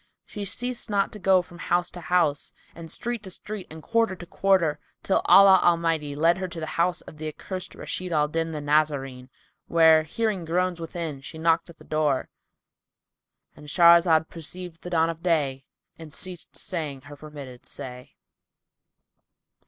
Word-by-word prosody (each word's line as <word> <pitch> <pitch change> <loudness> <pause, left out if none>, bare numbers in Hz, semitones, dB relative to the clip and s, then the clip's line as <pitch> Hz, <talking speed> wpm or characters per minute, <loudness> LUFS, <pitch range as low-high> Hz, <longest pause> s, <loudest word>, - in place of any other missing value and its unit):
She 205 -1 -6
ceased 245 +5 -3
not 200 -1 +1
to 210 - -10
go 185 -1 +4
from 175 -1 -15
house 175 0 0
to 175 - -9
house 155 -3 +1 0.2
and 165 -1 -10
street 240 -2 -2
to 195 - -9
street 200 +1 -6
and 160 0 -11
quarter 230 -4 +1
to 175 - -10
quarter, 175 -4 +2 0.2
till 195 - +2
Allah 195 -1 +8
Almighty 165 -4 +1
led 165 +4 +3
her 185 - -2
to 175 -2 -7
the 160 - -3 0.2
house 175 0 +1
of 155 - -13
the 155 0 -5
accursed 185 +4 -6
Rashid 180 -1 -5
al 150 -2 +2
Din 165 +2 -2
the 155 -2 -5
Nazarene 145 -4 0 0.4
where, 160 -1 +6
hearing 200 +4 -2
groans 175 +1 0
within, 165 -4 -5
she 160 +4 -9
knocked 165 +1 +1
at 170 - -13
the - - -16
door,—And 150 0 -6
Shahrazad 170 0 +5
perceived 170 +1 -7
the 180 - -7
dawn 165 -1 +2
of 165 0 -11
day 145 -7 0 0.3
and 160 -2 -10
ceased 180 +2 -7
to - - -7
say 155 -6 -4
her 145 0 -11
permitted 145 -4 -10
say. 125 -2 -8
165 Hz, 170 wpm, -25 LUFS, 155-180 Hz, 0.4 s, Allah